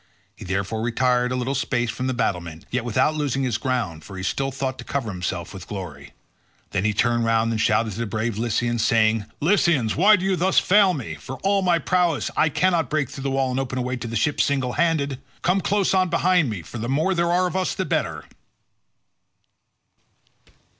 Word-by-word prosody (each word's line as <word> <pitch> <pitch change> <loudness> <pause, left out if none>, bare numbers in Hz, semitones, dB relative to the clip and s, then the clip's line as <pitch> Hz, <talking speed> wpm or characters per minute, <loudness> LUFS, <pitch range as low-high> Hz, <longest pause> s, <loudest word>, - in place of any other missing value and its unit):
He - - -11
therefore 100 +4 -2
retired 125 +1 +1
a - - -1
little 125 +2 -1
space 120 -3 -1
from 130 +2 -4
the 130 - 0
battlement, 85 -8 -3
yet 125 -1 -1
without 120 +6 +1
losing 140 -3 -1
all - - +1
his 115 -4 -1
ground, 110 -11 -2
for 95 +2 -10
he 95 - -5
still 135 +8 -1
thought 135 -1 -4
to - - -6
cover 130 -6 -3
himself 90 -1 -4
with 95 -2 -9
glory. 85 -8 -8 0.6
Then 100 +1 -1
he 110 - +3
turned 120 +3 +1
round 115 0 +2
and 110 -1 -1
shouted 110 0 +2
to 105 - -7
the 115 - -1
brave 110 +2 -2
Lycians 120 +1 0
saying, 110 -1 +2 0.2
"Lycians, 155 - +2
why 205 +7 +6
do 190 -1 -3
you 195 -1 +2
thus 185 +2 0
fail 195 -2 +5
me? 120 - -5
For 75 - -8
all 195 0 +2
my 180 -2 +3
prowess 170 -1 0
I 160 - +3
cannot 175 +2 +1
break 150 -4 -1
through 145 -2 -8
the - - +1
wall 135 -1 0
and 125 - -1
open 130 -1 -3
a 125 - -1
way 125 +1 -2
to 120 - -6
the 115 - -5
ships 145 +7 +2
single 130 -3 0
handed. 145 -6 0 0.2
Come 185 +2 +2
close 200 -1 +1
on 185 -1 +2
behind 170 -3 +2
me, 100 -6 -5
for 115 +9 -8
the 115 +2 -3
more 155 +8 +1
there 170 -1 +1
are 180 +1 +3
of 180 - -3
us 185 -1 0
the 190 - -2
better." 80 - -2
125 Hz, 215 wpm, -23 LUFS, 110-160 Hz, 0.6 s, why